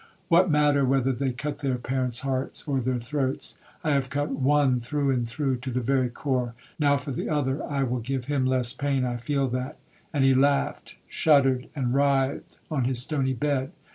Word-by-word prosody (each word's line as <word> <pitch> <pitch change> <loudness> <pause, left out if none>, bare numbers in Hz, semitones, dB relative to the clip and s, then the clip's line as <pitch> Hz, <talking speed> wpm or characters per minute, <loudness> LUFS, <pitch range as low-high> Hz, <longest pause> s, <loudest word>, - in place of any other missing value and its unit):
What 175 +2 +5
matter 150 -2 +3
whether 135 0 +2
they 130 +1 -1
cut 145 +3 -5
their 135 -3 0
parents 125 -1 -2
hearts 135 +2 -3
or 135 -2 0
their 125 +1 0
throats. 130 +2 -3 0.2
I 155 - +1
have 135 -2 +1
cut 145 +1 -1
one 135 -1 +2
through 140 +3 -1
and 120 -3 -1
through, 135 +1 -1
to 130 +2 -6
the 125 0 -1
very 130 +1 +1
core,—now 130 +3 -1
for 140 0 -6
the 125 - -3
other, 140 -3 0
it 140 -3 -1
will 125 +1 -1
give 130 +2 -3
him 140 -2 0
less 125 -2 +1
pain, 140 -2 0
I 120 -1 -2
feel 140 +2 0
that,'—and 130 +3 -4
he 135 - +5
laughed, 140 +2 +1
shuddered, 135 -4 +3
and 125 -4 -1
writhed 140 -1 +1
on 135 -5 0
his 130 0 0
stony 135 +1 0
bed. 140 +3 -1
135 Hz, 185 wpm, -26 LUFS, 125-145 Hz, 0.2 s, What